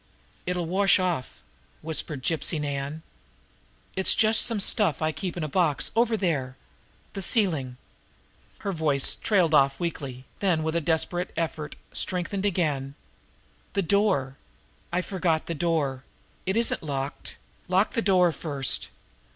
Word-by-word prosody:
"It'll 180 Hz, -1 st, -1 dB
wash 195 Hz, +4 st, +4 dB
off," 180 Hz, -8 st, -2 dB, 0.4 s
whispered 155 Hz, -3 st, -3 dB
Gypsy 160 Hz, +1 st, +1 dB
Nan. 145 Hz, +1 st, -3 dB, 0.9 s
"It's 190 Hz, -, +5 dB
just 220 Hz, 0 st, +4 dB
some 230 Hz, -3 st, +2 dB
stuff 195 Hz, -6 st, +3 dB
I 155 Hz, 0 st, +1 dB
keep 170 Hz, +4 st, -5 dB
in 170 Hz, -, -2 dB
a -, -, -1 dB
box 150 Hz, -4 st, +1 dB
over 230 Hz, -1 st, +3 dB
there 140 Hz, -9 st, -1 dB, 0.6 s
the 195 Hz, -, -4 dB
ceiling 160 Hz, -, +1 dB, 0.4 s
" -, -, -33 dB
Her 200 Hz, -, 0 dB
voice 155 Hz, -6 st, +2 dB
trailed 180 Hz, -7 st, +2 dB
off 135 Hz, -2 st, +4 dB
weakly, 135 Hz, -7 st, -4 dB
then 175 Hz, -6 st, +1 dB
with 160 Hz, +1 st, -1 dB
a 170 Hz, -, +2 dB
desperate 170 Hz, +3 st, 0 dB
effort 155 Hz, -2 st, -3 dB, 0.2 s
strengthened 190 Hz, +2 st, -1 dB
again. 145 Hz, -7 st, -1 dB, 0.8 s
"The 200 Hz, -, +1 dB
door! 175 Hz, -9 st, +2 dB, 0.5 s
I 180 Hz, +1 st, +1 dB
forgot 170 Hz, -5 st, 0 dB
the 170 Hz, -, -3 dB
door! 145 Hz, -5 st, 0 dB, 0.4 s
It 190 Hz, +3 st, +1 dB
isn't 235 Hz, -, 0 dB
locked! 140 Hz, -2 st, -4 dB, 0.3 s
Lock 190 Hz, +3 st, +2 dB
the 230 Hz, -, 0 dB
door 185 Hz, -4 st, +4 dB
first! 140 Hz, -5 st, -1 dB
165 Hz, 140 wpm, -26 LUFS, 145-190 Hz, 0.9 s, It's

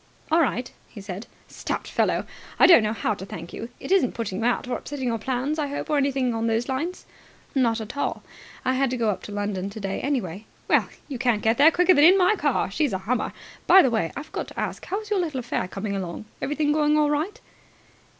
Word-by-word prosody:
"All 330 Hz, +1 st, +5 dB
right," 245 Hz, -, -1 dB, 0.2 s
he 215 Hz, -, -11 dB
said. 200 Hz, +2 st, -7 dB, 0.2 s
"Stout -, -, -4 dB
fellow! -, -, 0 dB, 0.3 s
I -, -, +7 dB
don't 345 Hz, -9 st, +8 dB
know 215 Hz, 0 st, 0 dB
how 215 Hz, 0 st, -1 dB
to 195 Hz, -, -8 dB
thank 170 Hz, -3 st, -8 dB
you. 230 Hz, -, -6 dB
It -, -, -7 dB
isn't 375 Hz, -11 st, +3 dB
putting 205 Hz, -4 st, -3 dB
you 225 Hz, -, -1 dB
out 245 Hz, +1 st, +1 dB
or 250 Hz, -, -1 dB
upsetting 265 Hz, -3 st, -4 dB
your 230 Hz, -1 st, -1 dB
plans, 265 Hz, +6 st, -2 dB
I 295 Hz, -, 0 dB
hope, 285 Hz, +2 st, -4 dB
or 300 Hz, -, +3 dB
anything 270 Hz, -3 st, +1 dB
on 225 Hz, 0 st, -1 dB
those 225 Hz, +1 st, 0 dB
lines?" 305 Hz, +8 st, -3 dB, 0.5 s
"Not 235 Hz, -4 st, +2 dB
at 220 Hz, +3 st, -7 dB
all. 285 Hz, -, -2 dB, 0.4 s
I 260 Hz, -, +2 dB
had 265 Hz, 0 st, +1 dB
to 255 Hz, -, -2 dB
go 225 Hz, -3 st, +2 dB
up 185 Hz, -2 st, -5 dB
to -, -, -8 dB
London 205 Hz, -2 st, -2 dB
today, 200 Hz, -2 st, -4 dB
anyway." 220 Hz, -, -2 dB, 0.2 s
"Well, -, -, +3 dB, 0.2 s
you 265 Hz, -4 st, -5 dB
can't 235 Hz, -4 st, +1 dB
get 225 Hz, +4 st, +2 dB
there 295 Hz, +3 st, +9 dB
quicker 360 Hz, +2 st, +4 dB
than 290 Hz, -, +5 dB
in 370 Hz, +4 st, +8 dB
my 370 Hz, +3 st, +4 dB
car. 290 Hz, -, 0 dB
She's 275 Hz, +2 st, 0 dB
a -, -, +1 dB
hummer. 235 Hz, 0 st, 0 dB, 0.4 s
By 380 Hz, -, +8 dB
the 260 Hz, -, +2 dB
way, 195 Hz, -8 st, 0 dB
I 285 Hz, -, -4 dB
forgot -, -, -5 dB
to -, -, -8 dB
ask. -, -, -3 dB
How 395 Hz, +4 st, -2 dB
is 425 Hz, -1 st, -13 dB
your 410 Hz, -, +2 dB
little 315 Hz, -7 st, -2 dB
affair 235 Hz, -6 st, -2 dB
coming 200 Hz, +2 st, -4 dB
along? 185 Hz, +1 st, -5 dB, 0.2 s
Everything 295 Hz, +1 st, 0 dB
going 300 Hz, 0 st, +3 dB
all 300 Hz, -1 st, +3 dB
right?" 325 Hz, +10 st, -1 dB
250 Hz, 235 wpm, -25 LUFS, 215-295 Hz, 0.5 s, there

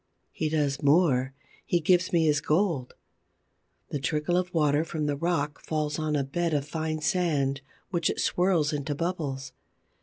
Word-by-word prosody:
He 155 Hz, -, -2 dB
does 145 Hz, -3 st, 0 dB
more: 140 Hz, -4 st, +3 dB, 0.3 s
he 175 Hz, -, +1 dB
gives 180 Hz, +2 st, +2 dB
me 165 Hz, -2 st, +3 dB
his 150 Hz, -2 st, +3 dB
gold. 155 Hz, -6 st, 0 dB, 0.9 s
The 145 Hz, -, -2 dB
trickle 150 Hz, +5 st, 0 dB
of 180 Hz, 0 st, 0 dB
water 150 Hz, -3 st, +2 dB
from 160 Hz, -2 st, -3 dB
the 145 Hz, -1 st, 0 dB
rock 150 Hz, -2 st, -1 dB
falls 150 Hz, -1 st, -2 dB
on 155 Hz, -1 st, 0 dB
a 140 Hz, -, +1 dB
bed 165 Hz, +4 st, -1 dB
of 145 Hz, -1 st, -1 dB
fine 155 Hz, 0 st, -3 dB
sand 150 Hz, -5 st, +1 dB, 0.3 s
which 170 Hz, -3 st, +1 dB
it -, -, -2 dB
swirls 175 Hz, -5 st, +2 dB
into 145 Hz, 0 st, -2 dB
bubbles. 140 Hz, -6 st, -3 dB
155 Hz, 160 wpm, -27 LUFS, 145-170 Hz, 0.9 s, more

